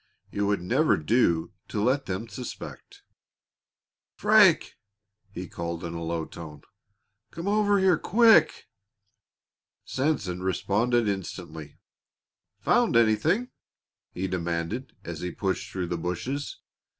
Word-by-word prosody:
It 100 Hz, -, -3 dB
would 100 Hz, -3 st, +1 dB
never 135 Hz, -, +2 dB
do 85 Hz, -2 st, +1 dB, 0.2 s
to -, -, -3 dB
let 130 Hz, +6 st, +1 dB
them 95 Hz, +5 st, -3 dB
suspect. 125 Hz, +1 st, -9 dB, 1.1 s
"Frank!" 205 Hz, -5 st, +5 dB, 0.6 s
he 95 Hz, -2 st, -7 dB
called 85 Hz, 0 st, -5 dB
in 85 Hz, -1 st, -5 dB
a 85 Hz, -, -5 dB
low 85 Hz, -1 st, -2 dB
tone. 75 Hz, -3 st, -10 dB, 0.7 s
"Come 170 Hz, +8 st, -7 dB
over 205 Hz, 0 st, +3 dB
here 190 Hz, -4 st, +3 dB
quick!" 220 Hz, -7 st, +4 dB, 1.2 s
Sanson 130 Hz, -, -1 dB
responded 105 Hz, +5 st, +1 dB
instantly 85 Hz, -6 st, -5 dB, 0.8 s
"Found -, -, +2 dB
anything?" 155 Hz, -, +2 dB, 0.6 s
he 95 Hz, +2 st, -3 dB
demanded, 85 Hz, +7 st, -3 dB
as 85 Hz, -2 st, -6 dB
he 90 Hz, -, -2 dB
plunged 95 Hz, +2 st, -3 dB
through 95 Hz, -2 st, -3 dB
the 85 Hz, 0 st, -3 dB
bushes. 90 Hz, -, -4 dB
100 Hz, 115 wpm, -27 LUFS, 85-140 Hz, 1.2 s, Frank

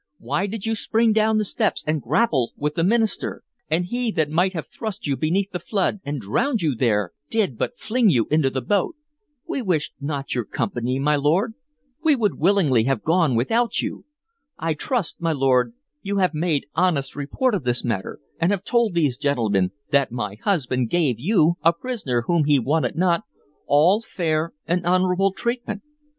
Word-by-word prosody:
Why 195 Hz, -, -1 dB
did 210 Hz, 0 st, -5 dB
you 225 Hz, -, 0 dB
spring 225 Hz, +1 st, +2 dB
down 220 Hz, 0 st, +3 dB
the 215 Hz, -, +1 dB
steps -, -, -1 dB
and 155 Hz, -1 st, 0 dB
grapple 140 Hz, -, +1 dB
with 150 Hz, +1 st, -1 dB
the 165 Hz, -, 0 dB
minister? 220 Hz, +3 st, +1 dB, 0.3 s
And 165 Hz, +3 st, +1 dB
he 240 Hz, +5 st, -2 dB
that 155 Hz, -2 st, 0 dB
might 180 Hz, +4 st, +2 dB
have 160 Hz, -4 st, -4 dB
thrust 215 Hz, -2 st, -6 dB
you 140 Hz, -2 st, 0 dB
beneath 185 Hz, +7 st, 0 dB
the 180 Hz, -, -3 dB
flood 200 Hz, +1 st, -1 dB
and 145 Hz, 0 st, -3 dB
drowned 205 Hz, -, 0 dB
you 150 Hz, -4 st, +2 dB
there 105 Hz, -6 st, +1 dB, 0.2 s
did 205 Hz, -, 0 dB
but 240 Hz, -, -3 dB
fling 230 Hz, -1 st, +2 dB
you 120 Hz, -, +3 dB
into 155 Hz, -3 st, +3 dB
the 130 Hz, -1 st, -3 dB
boat. 205 Hz, -, 0 dB, 0.5 s
We 270 Hz, -, -2 dB
wished 170 Hz, -8 st, -1 dB
not 140 Hz, -1 st, -3 dB
your 120 Hz, -3 st, -1 dB
company, 120 Hz, +5 st, -2 dB
my 145 Hz, +2 st, +2 dB
lord; 165 Hz, +10 st, +1 dB, 0.5 s
we 310 Hz, -3 st, +5 dB
would 215 Hz, -7 st, 0 dB
willingly 155 Hz, -, +3 dB
have 135 Hz, -4 st, 0 dB
gone 165 Hz, -5 st, +2 dB
without 225 Hz, -, +1 dB
you. -, -, -5 dB, 0.5 s
I 165 Hz, 0 st, -1 dB
trust, 200 Hz, -, -2 dB
my 165 Hz, -1 st, +1 dB
lord, 135 Hz, -, +2 dB, 0.3 s
you 200 Hz, 0 st, -2 dB
have 185 Hz, -3 st, +2 dB
made 155 Hz, -1 st, 0 dB
honest 150 Hz, -8 st, +1 dB
report 185 Hz, -, -1 dB
of 190 Hz, -8 st, -1 dB
this 120 Hz, 0 st, 0 dB
matter, 105 Hz, -6 st, -3 dB, 0.2 s
and 170 Hz, +4 st, +2 dB
have 200 Hz, -2 st, -1 dB
told 235 Hz, -5 st, +1 dB
these 145 Hz, -7 st, +1 dB
gentlemen 110 Hz, -10 st, +1 dB, 0.2 s
that 140 Hz, -4 st, +3 dB
my 105 Hz, -5 st, -3 dB
husband 130 Hz, -, 0 dB
gave 145 Hz, -10 st, +1 dB
you, 170 Hz, -, +3 dB
a 165 Hz, +2 st, +5 dB
prisoner 170 Hz, -, -2 dB
whom 170 Hz, +2 st, +2 dB
he 145 Hz, -1 st, +4 dB
wanted 150 Hz, +6 st, 0 dB
not, 175 Hz, +1 st, +2 dB, 0.5 s
all 170 Hz, +9 st, +4 dB
fair 165 Hz, -6 st, -1 dB
and 175 Hz, +1 st, 0 dB
honorable 185 Hz, +2 st, +2 dB
treatment. 235 Hz, 0 st, -3 dB
165 Hz, 185 wpm, -23 LUFS, 140-200 Hz, 0.5 s, we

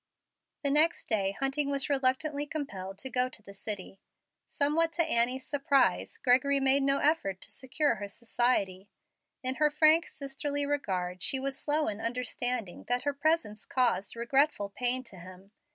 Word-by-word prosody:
The 280 Hz, -, +3 dB
next 310 Hz, +4 st, +2 dB
day 195 Hz, -3 st, +1 dB
Hunting 275 Hz, +5 st, 0 dB
was 280 Hz, -1 st, +1 dB
reluctantly 285 Hz, +2 st, 0 dB
compelled 195 Hz, -11 st, -6 dB
to 265 Hz, -, -4 dB
go 250 Hz, 0 st, +1 dB
to 220 Hz, -, -9 dB
the 200 Hz, -, -12 dB
city. 195 Hz, -1 st, -3 dB, 0.5 s
Somewhat 320 Hz, +3 st, +1 dB
to 340 Hz, -, +3 dB
Annie's 250 Hz, -1 st, +1 dB
surprise, 280 Hz, -1 st, +1 dB
Gregory 270 Hz, +2 st, +3 dB
made 270 Hz, +1 st, +3 dB
no 275 Hz, 0 st, +2 dB
effort 280 Hz, -, 0 dB
to -, -, -9 dB
secure 260 Hz, +3 st, 0 dB
her 205 Hz, -, -5 dB
society. 200 Hz, -3 st, -1 dB, 0.5 s
In 260 Hz, +1 st, +1 dB
her 300 Hz, -, +5 dB
frank, 310 Hz, +2 st, +4 dB
sisterly 285 Hz, +1 st, -3 dB
regard 185 Hz, -11 st, -2 dB
she 265 Hz, -, +2 dB
was 270 Hz, 0 st, -2 dB
slow 300 Hz, +2 st, 0 dB
in 210 Hz, +1 st, -4 dB
understanding 245 Hz, -3 st, -3 dB
that 245 Hz, +1 st, 0 dB
her 285 Hz, 0 st, 0 dB
presence 280 Hz, -8 st, 0 dB
caused 215 Hz, -3 st, 0 dB
regretful 235 Hz, -2 st, +1 dB
pain 250 Hz, +4 st, 0 dB
to 235 Hz, -6 st, -11 dB
him. 185 Hz, +2 st, -13 dB
260 Hz, 160 wpm, -29 LUFS, 210-285 Hz, 0.5 s, her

